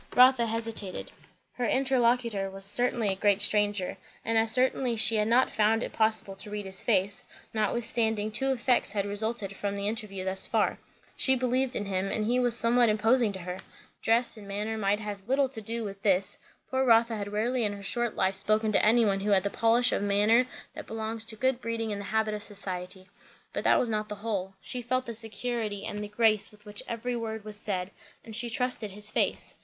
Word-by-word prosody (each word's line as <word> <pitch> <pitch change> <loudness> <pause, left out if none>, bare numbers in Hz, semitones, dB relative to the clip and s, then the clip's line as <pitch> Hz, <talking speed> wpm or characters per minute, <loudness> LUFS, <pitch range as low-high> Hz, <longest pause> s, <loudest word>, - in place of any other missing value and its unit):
Rotha 250 -2 +6
hesitated. 225 -4 -4 0.4
Her 245 -1 -2
interlocutor 240 -6 +1
was 195 0 -6
certainly 235 +1 +1
a 190 - 0
great 200 0 +2
stranger; 205 -2 +1 0.3
and 225 - 0
as 225 0 +3
certainly 250 0 +1
she 225 0 +2
had 210 0 +1
not 245 +3 +3
found 220 +2 +2
it - - -6
possible 220 -3 0
to 200 - -8
read 205 -1 -5
his 190 0 -6
face; 200 -3 +1 0.3
notwithstanding, 220 0 0
two 270 +5 0
effects 250 -1 +1
had 200 -2 0
resulted 205 -1 -2
from 200 0 -3
the 200 0 -2
interview 210 -4 -4
thus 190 0 +2
far; - - +1 0.4
she 265 - +4
believed 255 +1 0
in 205 - -2
him, 190 0 -1
and 215 - -1
he 245 +3 +2
was 245 -2 +4
somewhat 235 0 +4
imposing 225 +2 +3
to 190 - -7
her. 180 +1 -6 0.4
Dress 230 +1 +2
and 205 -2 -11
manner 210 +3 -3
might 205 -1 +1
have 210 -2 -5
a 195 +4 -23
little 270 +1 +3
to 240 -4 -5
do 230 +2 -3
with 200 -1 -7
this; 195 -2 +2 0.3
poor 260 0 +2
Rotha 230 -2 +4
had 205 -1 -5
rarely 235 +4 0
in 205 -1 0
her 200 0 -9
short 240 +2 0
life 190 0 +1
spoken 215 +2 +1
to - - +2
any 230 +2 +5
one 195 -2 +1
who 205 +2 -2
had 195 -2 +4
the 200 - -2
polish 235 +2 +3
of - - 0
manner 210 +5 +3 0.3
that - - -9
belongs 220 0 -4
to 225 -1 -5
good 260 +2 0
breeding 230 -1 -2
and 200 -1 -3
the - - -7
habit 220 +1 0
of 210 - -4
society; 185 -2 -6 0.5
but - - -3
that - - +5
was 245 - +1
not 215 0 -2
the 210 - -4
whole. 200 -3 -4
She 250 - -3
felt 255 +2 -1
the 235 - -5
security 220 -1 -3
and 210 0 -4
the - - -5
grace 215 0 +2
with 210 0 -20
which 205 0 -5
every 240 +1 -3
word 220 -2 -5
was 215 -1 -6
said, 195 -3 -3 0.3
and 225 -2 -5
she 235 +1 +2
trusted 230 -3 -1
his 210 +1 -3
face. - - -1
220 Hz, 215 wpm, -28 LUFS, 205-235 Hz, 0.5 s, Rotha